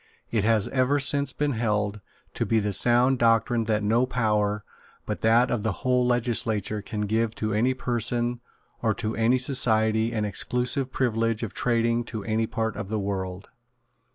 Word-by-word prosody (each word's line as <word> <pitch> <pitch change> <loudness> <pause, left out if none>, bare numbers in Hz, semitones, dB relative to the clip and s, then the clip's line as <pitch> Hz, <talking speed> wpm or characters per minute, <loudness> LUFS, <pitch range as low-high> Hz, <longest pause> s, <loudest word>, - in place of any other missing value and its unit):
It 110 -4 0
has 110 -2 +2
ever 135 +2 +1
since 140 -1 +2
been 145 +1 -1
held 105 -3 -1 0.3
to - - -2
be 115 - +1
the 105 -1 -1
sound 120 +5 +3
doctrine 115 0 +2
that 110 -1 0
no 115 +5 +2
power 105 -4 0 0.4
but - - -4
that 115 +3 +3
of 120 - -1
the 110 0 -1
whole 125 -1 +3
legislature 115 -4 +1
can 105 +1 -5
give 110 +2 -1
to 110 0 -2
any 125 +5 +1
person 120 -1 -1 0.4
or 110 -3 +1
to 110 -1 -3
any 115 +3 +2
society 110 -4 +2
an 110 -2 -1
exclusive 125 +5 -1
privilege 115 -3 0
of 110 - -5
trading 115 -1 0
to 110 -3 -6
any 110 +1 -1
part 110 0 -3
of - - -5
the 110 +2 -2
world. 95 -1 -4
115 Hz, 170 wpm, -25 LUFS, 110-125 Hz, 0.4 s, sound